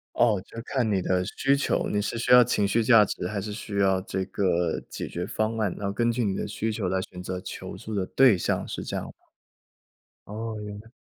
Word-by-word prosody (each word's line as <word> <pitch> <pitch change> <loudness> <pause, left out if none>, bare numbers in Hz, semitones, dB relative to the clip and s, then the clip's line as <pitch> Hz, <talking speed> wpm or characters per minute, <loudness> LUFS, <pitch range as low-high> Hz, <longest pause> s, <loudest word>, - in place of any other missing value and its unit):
哦， 110 -5 +3
就 - - -14
是 - - -3
看 125 -5 0
你 95 -2 +1
的 90 0 +1
需 135 +1 +3
求， 140 - 0
你 105 - 0
是 115 - -3
需 125 +1 -1
要 125 0 +10
情 105 -4 +1
绪 115 +3 +2
价 110 -2 +7
值， 90 - -4
还 105 - -2
是 105 +1 -5
需 105 -2 -5
要 95 -1 +3
这 95 -1 -3
个 90 -3 0
解 - - -5
决 90 +1 -4
方 110 +1 -1
案， 105 -5 0
然 100 - -3
后 100 - -2
根 120 +1 +2
据 115 0 -1
你 95 -2 0
的 - - -2
需 110 +2 -2
求 105 -4 -2
来 95 0 0
选 90 -1 -8
择 90 0 -4
求 - - -7
助 110 -1 -6
的 95 - 0
对 125 -2 +5
象， - - -1
是 - - -5
这 - - -5
样 - - -3
吗？ - - -9 1.2
哦， 110 +2 -5
原 105 0 -7
来 115 - -19
105 Hz, 265 characters per minute, -26 LUFS, 95-115 Hz, 1.2 s, 要